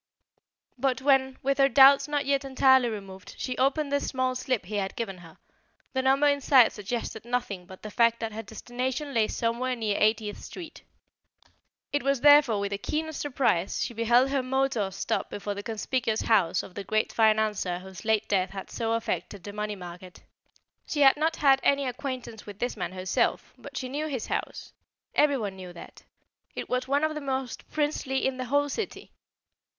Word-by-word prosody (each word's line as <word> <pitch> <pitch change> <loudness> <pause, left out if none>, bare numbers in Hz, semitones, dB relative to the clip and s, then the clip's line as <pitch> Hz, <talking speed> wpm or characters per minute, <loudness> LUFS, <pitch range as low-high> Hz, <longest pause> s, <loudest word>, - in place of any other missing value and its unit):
But 260 0 +1
when, 265 -2 +3
with 275 +1 0
her 275 0 +5
doubts 275 +1 +7
not 290 -1 -1
yet 275 0 +1
entirely 265 -2 +4
removed, 195 -3 -8
she 255 - -3
opened 280 +2 +1
the 285 - +2
small 255 -2 -1
slip 255 -3 -2
he 210 +3 -4
had 195 -1 -2
given 195 -6 -4
her, 165 -2 -15 0.6
the 260 - +1
number 270 +2 +3
inside 280 -4 +5
suggested 220 +1 -5
nothing 235 -7 -3
but 190 -1 -13
the 215 - -7
fact 230 0 +3
that 225 -1 -4
her 220 - -4
destination 250 +6 -4
lay 225 -3 +3
somewhere 240 +2 -1
near 220 -3 -1
Eightieth 215 -1 +1
Street. 340 -4 -10 1.1
It 290 - +1
was 275 -2 0
therefore 290 -7 +6
with 200 0 -2
the 200 - -3
keenest 315 +6 -3
surprise 250 -10 0
she - - -6
beheld 240 +4 +3
her 275 -1 +1
motor 255 -5 0
stop 195 - -2
before 205 0 -4
the 200 - -6
conspicuous 225 +1 -2
house 185 -6 +2
of 185 - -11
the 200 - -6
great 215 +3 0
financier 215 -5 +2
whose 190 +2 -10
late 220 -1 +1
death 190 -2 +1
had 195 -1 -8
so 225 -1 -1
affected 220 -4 -3
the 205 - -8
money 210 0 -3
market. 180 0 -11 0.6
She 295 - -1
had 270 -1 +7
not 315 +2 0
had 270 -2 +4
any 280 0 +2
acquaintance 250 -4 -5
with 205 -1 -9
this 245 +3 -2
man 185 -3 -4
herself, 185 0 -1
but 280 -1 -10
she 255 - -3
knew 290 +4 -3
his 260 -7 -3
house. - - -4 0.4
Everyone 260 -10 +1
knew 185 -2 -9
that. 170 - -13 0.5
It - - -5
was 255 0 -1
one 285 +2 +1
of 310 0 +1
the 300 - -5
most 265 -3 -4
princely 290 -3 -1
in 265 -1 -1
the 255 - -3
whole 285 +3 +1
city. 355 +10 -5
245 Hz, 185 wpm, -27 LUFS, 210-275 Hz, 1.1 s, doubts